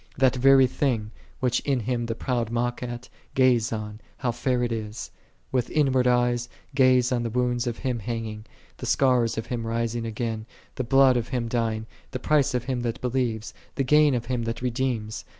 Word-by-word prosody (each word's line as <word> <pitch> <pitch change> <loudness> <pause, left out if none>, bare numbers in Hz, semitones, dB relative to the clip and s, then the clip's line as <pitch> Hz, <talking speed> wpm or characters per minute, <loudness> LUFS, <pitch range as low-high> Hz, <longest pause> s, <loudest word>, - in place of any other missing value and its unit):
That 130 0 +4
very 135 +1 +6
thing, 120 -5 -1 0.3
which 125 -1 +2
in 135 -4 0
Him 120 +1 -2
the 115 - -2
proud 120 -2 -1
mock 120 +1 -1
at, 120 0 -6 0.3
gaze 125 -3 +3
on, 105 -1 -5 0.2
how 125 -2 -1
fair 125 +1 0
it 120 - -1
is: 110 -1 -5 0.4
with 125 -3 0
inward 130 -4 +2
eyes 120 0 +2 0.2
gaze 130 -2 +4
on 125 -1 +1
the 120 - -2
wounds 120 +1 0
of 120 - -2
Him 125 -3 -2
hanging, 110 -1 -5 0.3
the - - -6
scars 125 -4 +2
of 115 - -2
Him 115 -2 -4
rising 115 0 -1
again, 110 0 -3 0.3
the 130 - -3
blood 130 +1 +5
of 120 -1 -2
Him 125 -3 -2
dying, 115 -2 -1 0.2
the 130 - -5
price 145 -2 +2
of 125 - 0
him 130 -1 -2
that 115 -1 -3
believes, 120 -3 -2 0.2
the 135 - +1
gain 150 +1 +5
of 120 -1 -2
Him 125 -1 -1
that 115 +2 -4
redeems. 120 -3 -2
120 Hz, 190 wpm, -25 LUFS, 115-130 Hz, 0.4 s, very